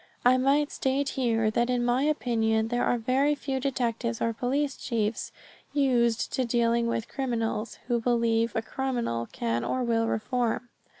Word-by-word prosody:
I 250 +1 +7
might 280 +3 +2
state 270 +1 0
here 225 -4 +1
that 235 +2 +1
in 245 -1 +1
my 245 +2 +2
opinion 225 -6 +1
there 240 +1 0
are 245 - +2
very 265 +6 +2
few 270 -2 -3
detectives 240 -3 -1
or 230 0 0
police 275 +4 -1
chiefs 220 -3 -2 0.4
used 245 -5 +2
to 260 - +1
dealing 235 -1 +1
with 230 -1 -2
criminals, 230 -4 -2
who 240 -2 0
believe 230 -1 +1
a 225 - 0
criminal 235 - -2
can 115 0 -1
or 255 - -1
will 230 -1 +1
reform. 240 +2 -1
240 Hz, 160 wpm, -27 LUFS, 225-260 Hz, 0.4 s, I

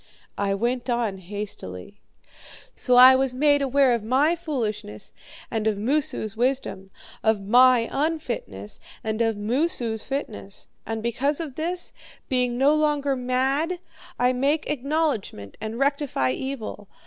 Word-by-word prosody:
I 200 -1 +1
went 240 +4 -1
on 230 -5 -1
hastily. 200 - -7 0.7
'So 250 - +2
I 255 +1 +10
was 260 -1 0
made 285 +1 +3
aware 270 -1 +3
of 235 -3 -1
my 275 +9 +3
foolishness 225 - -4 0.4
and 220 -1 -1
of 215 -2 +1
Moosu's 250 -2 -1
wisdom; 240 -6 -1 0.3
of 220 -3 +1
my 245 +1 +5
own 305 +4 +1
unfitness 105 - -6 0.2
and 220 +1 -2
of 225 -2 +1
Moosu's 230 0 -1
fitness. 100 - -6 0.2
And 225 -1 -3
because 270 +6 0
of 315 -5 -5
this, 350 +5 -2 0.4
being 250 -2 +1
no 275 +3 +4
longer 295 -2 +1
mad, 265 +7 0 0.4
I 250 +1 +3
make 280 +5 0
acknowledgment 280 - -2
and 220 +1 -4
rectify 275 - 0
evil. 225 - -5
250 Hz, 135 wpm, -24 LUFS, 215-280 Hz, 0.7 s, I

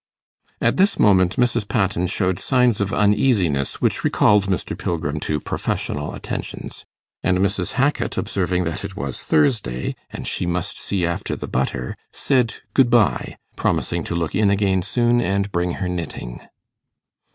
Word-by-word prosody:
At - - +1
this 195 +2 +3
moment 95 -3 +4
Mrs. 120 -3 +1
Patten 95 -5 0
showed 95 0 0
signs 125 -5 +2
of 100 0 0
uneasiness, 105 - +2
which - - +1
recalled 105 -1 +3
Mr. 95 -2 -1
Pilgrim 75 -3 -2
to 75 0 -1
professional 75 +1 -3
attentions; - - -6 0.4
and 95 -1 +2
Mrs. 95 -1 0
Hackit, 135 +5 0
observing 90 -2 0
that 85 -1 -3
it - - -6
was 65 -1 -4
Thursday, 75 - +1
and - - -7
she 90 - -1
must 90 0 -2
see 95 -4 0
after 85 0 -2
the - - -6
butter, 65 -1 -2 0.2
said 125 -5 +1 0.2
good 130 -3 +4
bye, 115 -4 +2 0.2
promising 85 -1 0
to 85 - -3
look 85 -2 -2
in 105 +1 +3
again 100 -2 +2
soon, 120 +5 +2
and 100 -2 0
bring 85 -1 0
her 95 - -3
knitting. 85 -9 -5
95 Hz, 150 wpm, -21 LUFS, 85-105 Hz, 0.4 s, moment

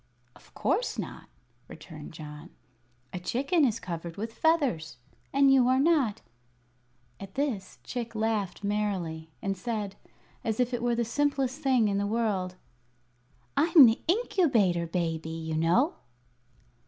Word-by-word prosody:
"Of - - -21
course - - 0
not," - - -6 0.4
returned 155 -1 -10
John. 150 +1 -10 0.6
"A 180 - -3
chicken 280 - +1
is 230 -5 +2
covered 170 -2 -6
with 225 +2 -4
feathers. 260 - +1 0.3
And 275 0 +5
you 255 -2 +5
are 255 +1 +4
not." 275 -8 +2 1.0
At 195 -1 -10
this 255 -10 -2
Chick 235 -2 -5
laughed 215 -4 -1
merrily, 190 -6 -2
and 195 0 -1
said, 205 0 -4 0.5
as 225 -1 -2
if 250 0 +1
it 245 - -1
were 240 0 +1
the 235 0 0
simplest 275 +2 0
thing 260 -6 +3
in 200 -1 0
the 200 - 0
world: 205 -5 -1 1.0
"I'm 320 -3 +8
the 225 -1 +3
Incubator 265 - +2
Baby, 165 -2 -2
you 160 -1 -4
know." 175 - +2
215 Hz, 135 wpm, -28 LUFS, 175-260 Hz, 1.0 s, I'm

